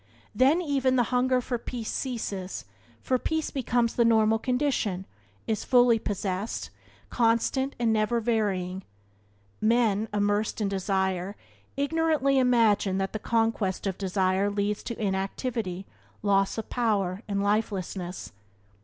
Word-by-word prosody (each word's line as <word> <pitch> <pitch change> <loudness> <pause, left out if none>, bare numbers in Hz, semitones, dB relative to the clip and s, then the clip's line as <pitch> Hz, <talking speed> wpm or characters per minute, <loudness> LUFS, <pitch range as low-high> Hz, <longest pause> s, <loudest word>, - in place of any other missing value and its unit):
Then 275 +10 +3
even 270 -4 +1
the 245 - +4
hunger 255 +1 +3
for 245 -1 -3
peace 235 -2 -5
ceases, 205 -7 -4 0.4
for 255 -1 +1
peace 320 +3 -2
becomes 240 -3 0
the 235 - +3
normal 225 -1 +4
condition, 250 -8 0 0.4
is 220 -2 -1
fully 245 -3 +5
possessed, 200 0 -3 0.4
constant 240 +4 +1
and 230 -2 +2
never 220 +2 +1
varying. 200 -5 -1 0.8
Men, 220 -1 +2
immersed 205 +1 0
in 210 - 0
desire, 190 -1 -1 0.4
ignorantly 285 -2 +2
imagine 225 -6 +3
that 195 0 -2
the 215 - -3
conquest 225 -4 0
of 190 -2 -2
desire, 190 0 +1
leads 205 0 -1
to 235 - -5
inactivity, 195 -1 -2 0.4
loss 195 0 +2
of 225 - -5
power, 205 -6 0
and 200 -1 -1
lifelessness. 195 -3 -2
220 Hz, 125 wpm, -27 LUFS, 195-245 Hz, 0.8 s, fully